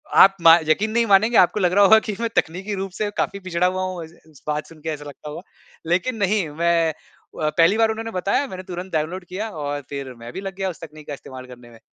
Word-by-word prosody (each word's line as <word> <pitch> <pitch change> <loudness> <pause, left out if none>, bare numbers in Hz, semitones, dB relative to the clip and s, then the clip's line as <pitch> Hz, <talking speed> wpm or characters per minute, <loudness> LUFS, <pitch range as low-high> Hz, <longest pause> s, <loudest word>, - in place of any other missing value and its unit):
आप 195 0 +8
म 165 0 +8
यक़ीन 210 +7 +2
नहीं 235 +1 +2
मानेंगे 220 +4 +4
आपको 180 +3 +4
लग 180 -3 +2
रहा 205 - +6
होगा 220 +3 +8
कि 210 - -2
मैं 230 0 -1
तकनीकी 190 +6 -1
रूप 195 0 -4
से 210 - 0
काफ़ी 200 - -1
पिछड़ा 180 -1 0
हुआ 185 +1 -2
हूँ 185 -2 -4
इस 160 - -16 0.2
इस 145 - -20
बात 150 0 -2
सुनके 160 0 -8
ऐसा 150 -2 -5
लगता 145 +1 -9
होगा। 150 +3 -7 0.5
लेकिन 190 +8 +1
नहीं 200 -2 +1
मैं 165 +1 +1
अ, 155 0 -6
पहली 165 +6 +3
बार 225 0 +3
उन्होंने 225 +1 -5
बताया 195 +8 0
मैंने 185 -5 -8
तुरंत 180 0 -7
डाउनलोड 165 +4 -2
किया 200 +5 -5
और 145 -4 -4
फिर 140 -2 -6
मैं 115 +1 -9
भी - - -5
लग 195 -1 -6
गया 195 -1 -2
उस 175 - -8
तकनीक 155 -1 -11
का - - -5
इस्तेमाल 130 -2 -10
करने 120 -1 -13
में। 115 - -16
180 Hz, 245 wpm, -22 LUFS, 155-195 Hz, 0.5 s, आप